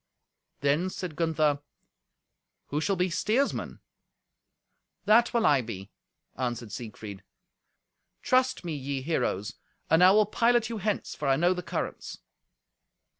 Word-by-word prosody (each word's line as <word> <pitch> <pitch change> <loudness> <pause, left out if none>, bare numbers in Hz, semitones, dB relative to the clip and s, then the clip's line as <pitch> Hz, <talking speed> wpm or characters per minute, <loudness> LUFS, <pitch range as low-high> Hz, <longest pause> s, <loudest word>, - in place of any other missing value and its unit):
Then 145 +6 +2
said 180 -4 -6
Gunther, 155 -3 +1 1.1
"Who 150 +2 -1
shall 195 +4 +1
be 180 0 0
steersman?" 230 +10 -1 1.2
"That 225 +3 +5
will 235 -2 +1
I 140 -3 +5
be," 105 -4 -8 0.4
answered 120 -3 -3
Siegfried. 105 -3 -8 1.0
"Trust 255 -6 +2
me, 165 - -3
ye 135 -1 -4
heroes, 105 - -1 0.4
and 165 +2 +6
I 185 - +9
will 210 +2 +5
pilot 235 +1 +2
you 225 - -4
hence, 210 +1 -2
for 145 - -4
I 135 - +4
know 175 +5 +3
the 180 - -4
currents." - - -5
165 Hz, 125 wpm, -28 LUFS, 135-210 Hz, 1.2 s, I